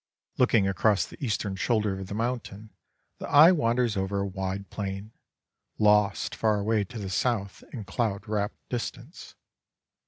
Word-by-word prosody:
Looking 115 Hz, -5 st, +4 dB
across 95 Hz, +1 st, +2 dB
the -, -, -12 dB
eastern 105 Hz, -5 st, -1 dB
shoulder 105 Hz, -1 st, 0 dB
of 95 Hz, -, -6 dB
the 100 Hz, -, -5 dB
mountain, 110 Hz, -2 st, -4 dB, 0.5 s
the -, -, -6 dB
eye 155 Hz, +5 st, +8 dB
wanders 120 Hz, -, +1 dB
over 95 Hz, +1 st, -1 dB
a -, -, -1 dB
wide 95 Hz, 0 st, -4 dB
plain, 100 Hz, +1 st, -5 dB, 0.7 s
lost 105 Hz, -1 st, +3 dB
far 110 Hz, -2 st, +1 dB
away 105 Hz, +1 st, +1 dB
to 120 Hz, +4 st, -10 dB
the 100 Hz, -3 st, -5 dB
south 100 Hz, 0 st, -1 dB
in 115 Hz, -6 st, -6 dB
cloud 100 Hz, +1 st, -2 dB
wrapt 105 Hz, 0 st, -1 dB
distance. 120 Hz, +5 st, -6 dB
105 Hz, 150 wpm, -27 LUFS, 100-115 Hz, 0.7 s, eye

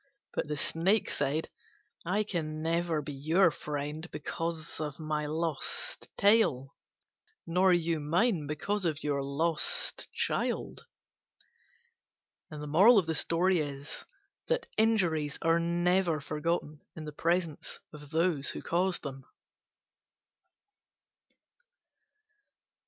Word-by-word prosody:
But -, -, -2 dB
the 150 Hz, 0 st, -3 dB
Snake 185 Hz, +9 st, +1 dB
said, 150 Hz, +4 st, -1 dB, 0.5 s
"I 195 Hz, +5 st, +1 dB
can 155 Hz, -6 st, -3 dB
never 165 Hz, -1 st, 0 dB
be 145 Hz, -, -6 dB
your 160 Hz, +6 st, +3 dB
friend 150 Hz, +3 st, -5 dB
because 165 Hz, +1 st, -4 dB
of 150 Hz, -1 st, -4 dB
my 155 Hz, -1 st, -2 dB
lost 160 Hz, -1 st, -2 dB
tail, 200 Hz, -, +3 dB, 0.7 s
nor 180 Hz, +3 st, +3 dB
you 170 Hz, -2 st, +1 dB
mine 165 Hz, +2 st, +1 dB
because 195 Hz, +8 st, -2 dB
of 155 Hz, -4 st, -1 dB
your 145 Hz, -1 st, 0 dB
lost 150 Hz, +4 st, +1 dB
child." -, -, -1 dB, 1.6 s
Injuries 160 Hz, -, +2 dB, 1.4 s
are 165 Hz, 0 st, +4 dB
never 175 Hz, 0 st, +1 dB
forgotten 150 Hz, 0 st, -2 dB
in 155 Hz, -, -7 dB
the 150 Hz, -, -6 dB
presence 165 Hz, 0 st, -1 dB
of 150 Hz, -1 st, -11 dB
those 160 Hz, -3 st, +1 dB
who -, -, -4 dB
caused 180 Hz, +2 st, +1 dB
them. 135 Hz, -2 st, -6 dB
160 Hz, 90 wpm, -30 LUFS, 150-175 Hz, 1.6 s, are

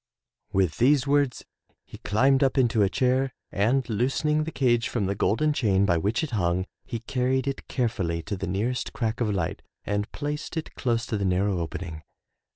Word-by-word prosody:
'' -, -, -65 dB
With 95 Hz, -4 st, +1 dB
these 135 Hz, +2 st, +4 dB
words 140 Hz, -3 st, +1 dB, 0.4 s
he -, -, -12 dB
climbed 130 Hz, +6 st, +3 dB
up 135 Hz, 0 st, +1 dB
into 115 Hz, -4 st, +3 dB
a 100 Hz, -, +4 dB
chair 130 Hz, +3 st, +1 dB, 0.2 s
and 120 Hz, +6 st, +1 dB
loosening 135 Hz, +7 st, +1 dB
the 160 Hz, -, -4 dB
cage 120 Hz, -5 st, +2 dB
from 110 Hz, -5 st, -1 dB
the 100 Hz, -, 0 dB
golden 150 Hz, +10 st, +1 dB
chain 100 Hz, -8 st, +2 dB
by 85 Hz, -4 st, +2 dB
which 105 Hz, -, 0 dB
it 155 Hz, -, -3 dB
hung, 90 Hz, -4 st, 0 dB, 0.2 s
he 115 Hz, -4 st, -4 dB
carried 130 Hz, +2 st, 0 dB
it 135 Hz, -, -4 dB
carefully 90 Hz, -9 st, -1 dB
to 100 Hz, -, -3 dB
the 95 Hz, -, -4 dB
nearest 110 Hz, +8 st, -2 dB
crack 115 Hz, 0 st, -2 dB
of 115 Hz, -, +1 dB
light 90 Hz, -5 st, -2 dB, 0.2 s
and 105 Hz, +1 st, -2 dB
placed 150 Hz, +3 st, -4 dB
it 160 Hz, -, -4 dB
close 120 Hz, -2 st, -1 dB
to 110 Hz, -, -2 dB
the 100 Hz, -, -1 dB
narrow 95 Hz, 0 st, +1 dB
opening. 80 Hz, -1 st, -5 dB
115 Hz, 190 wpm, -26 LUFS, 100-135 Hz, 0.4 s, these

